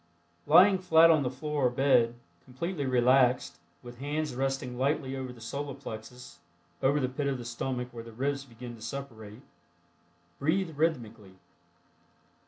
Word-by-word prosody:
Lying 185 Hz, +5 st, +7 dB
flat 165 Hz, -2 st, +6 dB
on 155 Hz, -2 st, +4 dB
the 130 Hz, -, -1 dB
floor 145 Hz, +1 st, -1 dB
or -, -, +2 dB
bed, 125 Hz, -2 st, +3 dB, 0.3 s
completely 145 Hz, +3 st, -4 dB
relaxed, 125 Hz, -7 st, +3 dB, 0.3 s
with 120 Hz, 0 st, -11 dB
hands 150 Hz, +1 st, -2 dB
resting 135 Hz, -1 st, -2 dB
lightly 135 Hz, +1 st, -1 dB
over 130 Hz, -1 st, -5 dB
the 125 Hz, -, -14 dB
Solar 140 Hz, +4 st, -5 dB
Plexus 110 Hz, -7 st, -10 dB, 0.4 s
(over 140 Hz, +2 st, +3 dB
the 130 Hz, -, 0 dB
pit 140 Hz, +2 st, -3 dB
of 135 Hz, -1 st, -1 dB
the 120 Hz, -, -8 dB
stomach, 125 Hz, +1 st, -3 dB
where 115 Hz, -1 st, -8 dB
the 115 Hz, -, -11 dB
ribs 140 Hz, +4 st, -2 dB
begin 120 Hz, -2 st, -10 dB
to 110 Hz, -, -16 dB
separate), 115 Hz, -2 st, -8 dB, 1.0 s
breathe 160 Hz, +2 st, 0 dB
rhythmically. 115 Hz, -, -2 dB
130 Hz, 150 wpm, -29 LUFS, 120-145 Hz, 1.0 s, Lying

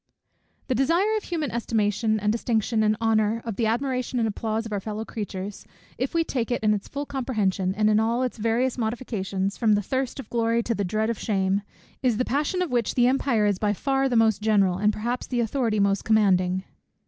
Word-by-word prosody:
_ -, -, -39 dB
The 260 Hz, -, +1 dB
desire 335 Hz, -, +2 dB
of 430 Hz, -, -3 dB
human 315 Hz, -7 st, -2 dB
estimation, 220 Hz, -1 st, 0 dB
and 210 Hz, 0 st, +1 dB
distinction, 225 Hz, -1 st, 0 dB
and 215 Hz, 0 st, +2 dB
honour, 220 Hz, 0 st, +2 dB
of 225 Hz, -3 st, -3 dB
the 225 Hz, +1 st, 0 dB
admiration 255 Hz, +2 st, -1 dB
and 230 Hz, -2 st, +2 dB
applause 220 Hz, +1 st, -2 dB
of 225 Hz, -, -7 dB
our 205 Hz, -, 0 dB
fellow 215 Hz, +2 st, -5 dB
creatures, 200 Hz, -2 st, -6 dB, 0.4 s
if 260 Hz, +6 st, -2 dB
we 330 Hz, -, +3 dB
take 245 Hz, -7 st, -2 dB
it 245 Hz, -, -1 dB
in 215 Hz, 0 st, +4 dB
its 205 Hz, -1 st, -3 dB
full 285 Hz, +1 st, -4 dB
comprehension, 210 Hz, -9 st, -1 dB
and 215 Hz, 0 st, +2 dB
in 215 Hz, 0 st, +4 dB
all 230 Hz, +3 st, +1 dB
its 250 Hz, -2 st, -3 dB
various 235 Hz, +4 st, 0 dB
modifications, 205 Hz, -4 st, -2 dB
from 220 Hz, -3 st, +4 dB
the 205 Hz, 0 st, +1 dB
thirst 260 Hz, +5 st, -2 dB
of 270 Hz, -, -7 dB
glory 230 Hz, 0 st, +1 dB
to 235 Hz, -, -1 dB
the 205 Hz, -, -2 dB
dread 215 Hz, +4 st, 0 dB
of 230 Hz, -, -5 dB
shame, 195 Hz, -2 st, 0 dB, 0.4 s
is 245 Hz, -5 st, +2 dB
the 255 Hz, -, 0 dB
passion 300 Hz, +7 st, 0 dB
of 350 Hz, -, -5 dB
which 240 Hz, -3 st, 0 dB
the 245 Hz, -, +4 dB
empire 250 Hz, -4 st, +2 dB
is 200 Hz, -2 st, +1 dB
by 210 Hz, -1 st, +1 dB
far 270 Hz, +4 st, 0 dB
the 245 Hz, -, 0 dB
most 220 Hz, -2 st, +3 dB
general, 200 Hz, -4 st, +2 dB
and 210 Hz, +1 st, +3 dB
perhaps 240 Hz, +4 st, -3 dB
the 245 Hz, -, -1 dB
authority 230 Hz, -1 st, 0 dB
the -, -, +2 dB
most 200 Hz, 0 st, +1 dB
commanding. 190 Hz, -4 st, +2 dB
225 Hz, 220 wpm, -25 LUFS, 210-250 Hz, 0.4 s, in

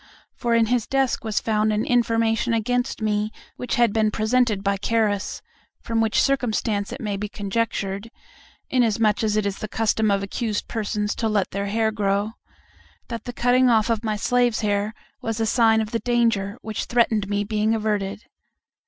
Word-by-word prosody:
For 235 Hz, -2 st, 0 dB
in 230 Hz, -1 st, +4 dB
his 240 Hz, 0 st, 0 dB
desk 270 Hz, -1 st, 0 dB
was 220 Hz, -2 st, 0 dB
found 215 Hz, -1 st, +1 dB
an 210 Hz, +1 st, 0 dB
information 230 Hz, -1 st, +2 dB
against 245 Hz, +1 st, -1 dB
me 210 Hz, 0 st, 0 dB, 0.2 s
which 250 Hz, -, -3 dB
had 235 Hz, -3 st, +3 dB
been 220 Hz, -1 st, +2 dB
presented 220 Hz, -1 st, +1 dB
by 200 Hz, 0 st, +1 dB
Carus; 205 Hz, -1 st, -1 dB, 0.4 s
from 230 Hz, -1 st, -1 dB
which 220 Hz, -1 st, +2 dB
circumstance 220 Hz, -6 st, 0 dB
it -, -, -6 dB
may 210 Hz, -5 st, -3 dB
be 210 Hz, +1 st, -4 dB
conjectured 200 Hz, 0 st, -2 dB, 0.6 s
inasmuch 225 Hz, -4 st, +2 dB
as 215 Hz, -1 st, +1 dB
it 215 Hz, -, +1 dB
is 200 Hz, -1 st, -2 dB
the 215 Hz, -, -4 dB
custom 220 Hz, 0 st, +1 dB
of 200 Hz, -1 st, +1 dB
accused 210 Hz, +1 st, -3 dB
persons 210 Hz, -2 st, -2 dB
to 225 Hz, -, 0 dB
let 205 Hz, -3 st, 0 dB
their 200 Hz, +1 st, -2 dB
hair 220 Hz, +2 st, +1 dB
grow 205 Hz, 0 st, 0 dB, 0.8 s
that 230 Hz, -2 st, -5 dB
the 245 Hz, -, -4 dB
cutting 250 Hz, +1 st, +3 dB
off 225 Hz, 0 st, +3 dB
of 225 Hz, 0 st, -1 dB
my 215 Hz, -1 st, -1 dB
slaves' 245 Hz, +1 st, +1 dB
hair 205 Hz, +1 st, 0 dB, 0.3 s
was 225 Hz, -1 st, -3 dB
a 225 Hz, -, +1 dB
sign 225 Hz, -1 st, +4 dB
of 215 Hz, 0 st, -4 dB
the 230 Hz, -, 0 dB
danger 230 Hz, -4 st, +1 dB
which 220 Hz, -1 st, -3 dB
threatened 225 Hz, -4 st, +1 dB
me 205 Hz, 0 st, 0 dB
being 215 Hz, +1 st, 0 dB
averted. 210 Hz, -2 st, -2 dB
220 Hz, 180 wpm, -23 LUFS, 210-230 Hz, 0.8 s, in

